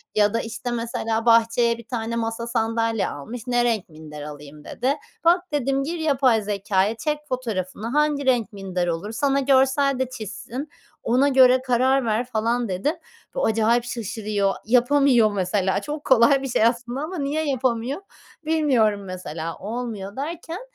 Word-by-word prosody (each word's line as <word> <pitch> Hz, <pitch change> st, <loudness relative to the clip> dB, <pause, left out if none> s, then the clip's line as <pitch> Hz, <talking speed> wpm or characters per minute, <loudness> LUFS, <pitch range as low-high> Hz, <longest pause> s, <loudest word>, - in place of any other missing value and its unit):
ya 210 Hz, 0 st, +3 dB
da 230 Hz, -, +1 dB
işte 235 Hz, +2 st, -5 dB
mesela 230 Hz, -1 st, -2 dB
bahçeye 230 Hz, 0 st, +4 dB
1 235 Hz, -1 st, -13 dB
tane 230 Hz, -1 st, -3 dB
masa, 230 Hz, 0 st, -3 dB
sandalye 225 Hz, -1 st, 0 dB
almış, 225 Hz, -, -7 dB
"ne 245 Hz, -1 st, +2 dB
renk 225 Hz, -7 st, 0 dB
minder 155 Hz, -1 st, -10 dB
alayım" 150 Hz, 0 st, -10 dB
dedi. 265 Hz, +4 st, -1 dB, 0.3 s
Bak 350 Hz, +1 st, +3 dB
dedim, 275 Hz, -1 st, 0 dB
gir 335 Hz, +3 st, -4 dB
yapay 265 Hz, -7 st, +3 dB
zekâya, 200 Hz, +1 st, 0 dB
çek 300 Hz, +6 st, -2 dB
fotoğrafını 220 Hz, -4 st, -3 dB
hangi 295 Hz, +1 st, +1 dB
renk 240 Hz, -4 st, +1 dB
minder 185 Hz, -3 st, -3 dB
olur, 170 Hz, +6 st, -3 dB
sana 275 Hz, +2 st, +1 dB
görsel 270 Hz, 0 st, +3 dB
de 260 Hz, -1 st, -1 dB
çizsin. 250 Hz, +5 st, -7 dB, 0.3 s
"Ona 255 Hz, +4 st, +3 dB
göre 260 Hz, -1 st, +5 dB
karar 260 Hz, +1 st, +2 dB
ver." 225 Hz, +2 st, 0 dB
falan 235 Hz, -1 st, -1 dB
dedim. 205 Hz, -, -1 dB, 0.4 s
Bu -, -, 0 dB
acayip 225 Hz, +2 st, +2 dB
şaşırıyor. 210 Hz, -4 st, -2 dB
Yapamıyor 245 Hz, -1 st, +4 dB
mesela. 195 Hz, 0 st, 0 dB
Çok 300 Hz, 0 st, -5 dB
kolay 265 Hz, +1 st, +5 dB
bir 270 Hz, -, -3 dB
şey 230 Hz, -2 st, +2 dB
aslında 240 Hz, +3 st, 0 dB
ama 345 Hz, +4 st, -5 dB
niye 300 Hz, +2 st, -1 dB
yapamıyor, 260 Hz, +4 st, -1 dB, 0.4 s
bilmiyorum 250 Hz, -11 st, +2 dB
mesela. 165 Hz, -3 st, -6 dB
Olmuyor. 215 Hz, -2 st, -5 dB
Derken, 330 Hz, +5 st, -5 dB
235 Hz, 155 wpm, -23 LUFS, 215-270 Hz, 0.4 s, göre